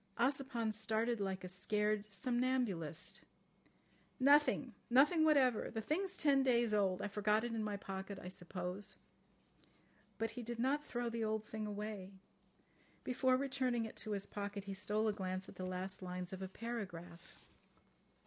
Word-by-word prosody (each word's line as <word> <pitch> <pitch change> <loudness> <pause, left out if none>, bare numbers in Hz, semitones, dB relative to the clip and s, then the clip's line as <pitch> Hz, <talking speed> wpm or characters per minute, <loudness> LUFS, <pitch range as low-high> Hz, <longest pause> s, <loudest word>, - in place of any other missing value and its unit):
Ossipon 250 -3 +1
started 220 +2 +1
like 190 -2 -2
a - - -4
scared 210 +3 0
somnambulist. 240 - -1 1.0
"Nothing. 280 -2 +5 0.2
Nothing 295 +6 +6
whatever. 270 -7 +4
The 225 - -3
thing's 365 - -1
ten 280 -3 +5
days 240 -4 +3
old. 195 -2 +2
I - - 0
forgot 210 +2 +2
it 240 -1 -2
in 225 -1 -1
my 210 -1 -2
pocket, 195 0 -5
I - - -8
suppose." 180 +1 -4 1.2
But 225 -1 -1
he 245 - -6
did 240 0 -4
not 270 +5 +1
throw 240 -3 -2
the 230 -1 -2
old 215 0 0
thing 215 0 -4
away. 205 -2 -5 0.9
Before 255 0 +3
returning 255 -3 0
it 220 - -8
to 215 - -1
his 200 -1 -1
pocket 200 -1 -4
he 200 0 -5
stole 210 +3 0
a 215 - +2
glance 190 -1 -3
at - - -10
the 185 - -4
last 185 +1 -4
lines 180 0 -4
of 190 - -6
a 190 - -2
paragraph. 185 -6 -7
215 Hz, 160 wpm, -38 LUFS, 195-245 Hz, 1.2 s, Nothing